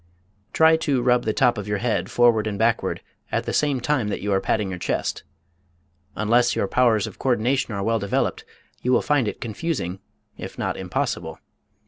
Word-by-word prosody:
Try 160 0 +5
to 140 -6 0
rub 125 0 +3
the 110 - +1
top 120 -1 +2
of 105 - -6
your 105 0 0
head 115 +2 -1
forward 115 -3 +3
and 105 -2 -3
backward 115 +2 0 0.3
at - - 0
the - - -3
same 145 -3 +1
time 125 -3 0
that 105 - -2
you 105 - -3
are 95 - +2
patting 100 -1 0
your 90 - -5
chest. - - -2 0.9
Unless 120 +3 +2
your - - 0
powers 110 -2 +3
of - - -9
coördination 125 +1 +1
are 100 - -2
well 115 +2 +1
developed 100 -1 -1 0.4
you 125 - 0
will 125 - +3
find 145 -6 +2
it - - -4
confusing, 110 - -3 0.4
if - - -8
not - - -2
impossible. - - -3
115 Hz, 185 wpm, -23 LUFS, 105-125 Hz, 0.9 s, Try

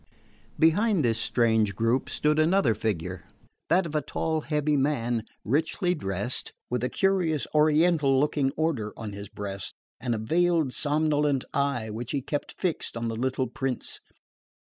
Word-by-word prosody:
Behind 180 - +3
this 115 -1 +1
strange 110 -5 +2
group 115 +5 +1
stood 150 +1 +1
another 160 - +4
figure, 90 -5 -3 0.4
that 175 +3 +4
of 160 - -6
a 150 - +1
tall 160 +2 -2
heavy 150 -1 0
man, 120 -5 0 0.2
richly 160 - +1
dressed, 100 - -2 0.2
with 125 -1 -1
a 125 - +1
curious 180 -6 +1
Oriental 150 -2 +4
looking 145 -1 +2
order 145 -10 -1
on 105 -2 -6
his 100 0 -8
breast 100 -1 -6 0.2
and 120 -1 -1
a - - -2
veiled 160 +4 +1
somnolent 150 -2 +1
eye 140 -6 0
which 115 +2 -5
he 140 - 0
kept 145 +1 -4
fixed 175 -9 -1
on 115 0 -2
the 115 - -3
little 130 +2 0
prince. 130 -1 -3
140 Hz, 150 wpm, -27 LUFS, 115-155 Hz, 0.4 s, another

